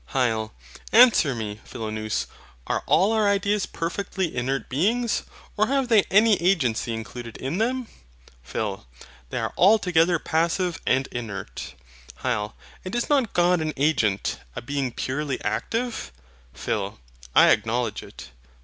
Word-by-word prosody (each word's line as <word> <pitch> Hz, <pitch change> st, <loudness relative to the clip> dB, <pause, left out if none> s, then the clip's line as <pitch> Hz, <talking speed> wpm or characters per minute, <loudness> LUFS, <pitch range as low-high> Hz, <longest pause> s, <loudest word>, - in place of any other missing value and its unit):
HYL. 110 Hz, -4 st, +1 dB, 0.4 s
Answer 220 Hz, -, +6 dB
me, 110 Hz, -1 st, -5 dB
Philonous. 110 Hz, -1 st, -3 dB, 0.4 s
Are -, -, -1 dB
all 195 Hz, +6 st, +4 dB
our 215 Hz, -2 st, +3 dB
ideas 200 Hz, 0 st, +1 dB
perfectly 185 Hz, +1 st, -3 dB
inert 130 Hz, +2 st, -1 dB
beings? 215 Hz, -, +1 dB, 0.3 s
Or 215 Hz, -, +2 dB
have 270 Hz, -1 st, 0 dB
they 220 Hz, -3 st, +6 dB
any 210 Hz, 0 st, +5 dB
agency 135 Hz, -, +1 dB
included 115 Hz, +1 st, -6 dB
in 140 Hz, +9 st, -3 dB
them? 250 Hz, +2 st, 0 dB, 0.5 s
PHIL. 95 Hz, -, -4 dB, 0.4 s
They -, -, -4 dB
are -, -, -2 dB
altogether 180 Hz, -4 st, +4 dB
passive 170 Hz, +2 st, 0 dB
and 135 Hz, +1 st, +3 dB
inert. 100 Hz, -, -6 dB, 0.5 s
HYL. 110 Hz, -4 st, -1 dB, 0.3 s
And 185 Hz, +4 st, -5 dB
is 240 Hz, -, -1 dB
not 270 Hz, -7 st, +2 dB
God 175 Hz, -1 st, +3 dB
an 155 Hz, -1 st, -2 dB
agent, 115 Hz, -9 st, +1 dB, 0.2 s
a -, -, -4 dB
being 135 Hz, 0 st, -2 dB
purely 135 Hz, +3 st, -3 dB
active? 225 Hz, -, -2 dB, 0.4 s
PHIL. -, -, -3 dB, 0.4 s
I -, -, +8 dB
acknowledge 115 Hz, +1 st, 0 dB
it. -, -, -11 dB
155 Hz, 130 wpm, -24 LUFS, -, 0.5 s, I